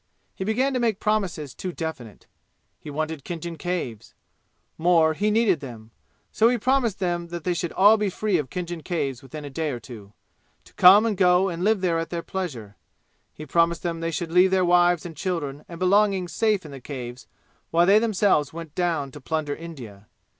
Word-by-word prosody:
He - - -5
began 250 +7 0
to 255 - 0
make 225 -5 0
promises 180 -10 -1
too 185 - -5
definite. 160 - -7 0.5
He - - -10
wanted 155 0 -4
Khinjan 170 -1 -6
Caves. 170 - -4 0.6
More, 165 -1 +3
he 205 +7 0
needed 210 -6 +2
them. 115 -5 -10 0.4
So 225 +2 +4
he 245 - +1
promised 245 -3 +1
them 175 -2 -2
they 175 +1 -3
should 170 0 -3
all 205 +3 +6
be 210 -1 0
free 195 -1 0
of 140 -4 -4
Khinjan 175 -2 -5
Caves 140 -8 -3
within 145 +3 -9
a 145 - -8
day 155 +3 -2
or 125 -4 -4
two, 105 -5 -12 0.5
to - - -21
come 200 +5 +7
and 220 -2 0
go 180 0 +4
and 175 0 -4
live 210 -1 +2
there 170 -3 +1
at 165 -1 -4
their 170 -1 -4
pleasure. 125 - -6 0.5
He 155 - -10
promised 170 +3 +1
them 170 -2 -2
they 165 0 -2
should 165 +1 -4
leave 180 +2 +5
their 185 -1 +2
wives 175 -1 +3
and 165 -2 -7
children 150 -4 -3
and 170 - -8
belongings 190 -1 +2
safe 210 -2 +1
in 150 - -9
the 135 -2 -9
Caves 125 -2 -8 0.4
while 170 +1 +3
they 200 +3 +6
themselves 200 - +2
went 165 -2 -9
down 165 -6 -1
to 145 - -11
plunder 155 0 -2
India. 120 -12 -10
170 Hz, 195 wpm, -24 LUFS, 150-190 Hz, 0.6 s, come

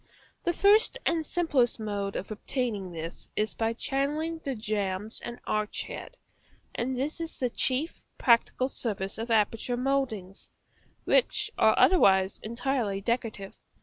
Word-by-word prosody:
The 345 - +3
first 420 +7 +5
and 330 -1 +1
simplest 295 -8 +1
mode 200 -2 -3
of 195 - -4
obtaining 215 -4 -3
this 165 0 -7
is 215 +1 0
by 225 0 0
channelling 300 +6 -1
the 275 -3 -3
jambs 210 -1 -3
and 240 0 -6
arch 215 0 -1
head; - - -8 0.6
and 255 +2 -2
this 285 +6 -2
is 330 0 -5
the 250 -2 0
chief 275 +8 0 0.2
practical 245 +1 +3
service 205 -6 -3
of 230 +2 -4
aperture 225 +2 +1
mouldings, 250 -8 -2 0.5
which 435 -3 +2
are - - +4
otherwise 190 - +5
entirely 235 -3 -1
decorative. 215 -2 -2
235 Hz, 135 wpm, -28 LUFS, 210-275 Hz, 0.6 s, first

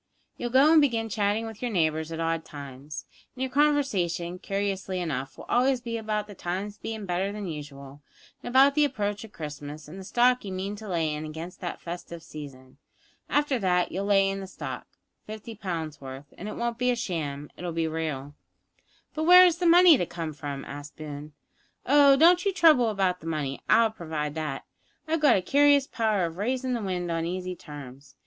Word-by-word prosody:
You'll 240 - -4
go 270 +5 +5
an' 325 - +7
begin 230 -6 +1
chatting 210 +1 0
with 225 -2 -9
your 245 - -1
neighbours 160 -5 0
at 165 - -5
odd 165 0 -1
times, 140 +1 -9 0.3
and 260 - -3
your 260 - -3
conversation, 200 - +1
curiously 195 -1 -2
enough, 135 -6 -4
will - - -9
always 255 +1 +2
be 235 -1 -5
about 215 -2 -2
the 210 - -11
times 195 +3 -4
bein' 220 -2 -5
better 185 +2 -1
than 205 -1 -5
usual, 145 -3 -8 0.4
an' - - -6
about 270 +3 +6
the 300 +1 +3
approach 210 -7 -1
of 220 - -11
Christmas, 150 -2 -8
an' 165 +5 -10
the 190 - -8
stock 245 +5 +3
you 200 - -6
mean 195 +2 -3
to 215 +1 -9
lay 165 -5 0
in 150 +1 -4
against 160 +3 -8
that 175 - -4
festive 170 -1 -7
season. 140 -4 -11 0.5
After 290 -3 +1
that 180 -3 +1
you'll 195 +3 -2
lay 195 -1 +4
in 195 0 -2
the 195 - -7
stock - - -7 0.4
fifty 215 +1 -7
pounds' 165 -8 -5
worth; 135 +1 -9
and 205 - -7
it - - -6
won't 235 0 -2
be 250 0 +2
sham; 150 -10 -4
it'll 175 -1 -5
be 165 0 -1
real 155 -3 -4 0.4
" - - -38
"But 315 0 -2
where 360 +2 +9
is 345 -1 +2
the 355 - +2
money 340 -4 +8
to - - +1
come 165 -3 -5
from?" 140 -1 -6
asked 145 +1 -9
Boone. 150 -1 -8 0.5
"Oh, 280 0 +6
don't 345 +5 +6
you 395 - +2
trouble 315 -10 +5
about 190 -3 0
the 165 - -10
money; 145 -4 -3
I'll 225 -1 +5
provide 155 -7 -4
that. 155 -3 -4 0.4
I've 320 0 -1
a 235 -10 +5
curious 285 +4 +4
power 215 -7 0
of 165 0 -6
raisin' 255 +5 -1
the 235 - -1
wind 180 -3 -2
on 165 0 -1
easy 185 +1 -4
terms. 140 -4 -11
190 Hz, 200 wpm, -27 LUFS, 155-240 Hz, 0.5 s, where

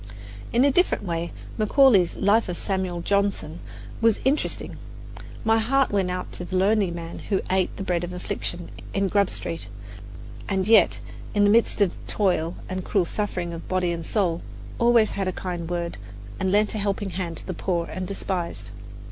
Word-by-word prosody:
In 245 +3 +4
a 285 - +5
different 355 - +2
way 170 -2 -2 0.3
Macaulay's 215 -5 +5
"Life 205 +1 +3
of 175 - -2
Samuel 185 -3 -2
Johnson" 200 -4 0 0.4
was 225 -2 +4
interesting. 280 +3 0 0.7
My 225 0 +4
heart 270 +4 +2
went 195 -3 +1
out 180 0 -3
to - - -5
the 185 - -5
lonely 200 +1 +3
man 170 -1 -6
who 195 -3 +2
ate 185 -1 +1
the 195 - -4
bread 175 -2 0
of 175 - -4
affliction 180 -1 -4 0.2
in 195 0 +1
Grub 200 -1 +3
Street, 165 -10 -2 0.8
and 190 -1 0
yet, 220 -5 +5 0.4
in 205 - +4
the 205 - +5
midst 225 -1 +3
of 195 -4 +3
toil 180 -4 +1
and 185 0 -4
cruel 195 -2 +1
suffering 180 -3 -3
of 165 - -8
body 185 -2 +1
and 170 -1 -3
soul, 175 -2 0 0.4
always 235 -2 +4
had 195 -2 -2
a - - +1
kind 175 -2 -4
word, 170 -8 -3 0.4
and 190 -1 0
lent 210 +2 +3
a 215 - -2
helping 200 -1 -1
hand 170 -2 -4
to - - -8
the 185 - -3
poor 170 -1 -1
and 185 +1 -5
despised. 190 -3 -4
190 Hz, 180 wpm, -25 LUFS, 175-205 Hz, 0.8 s, a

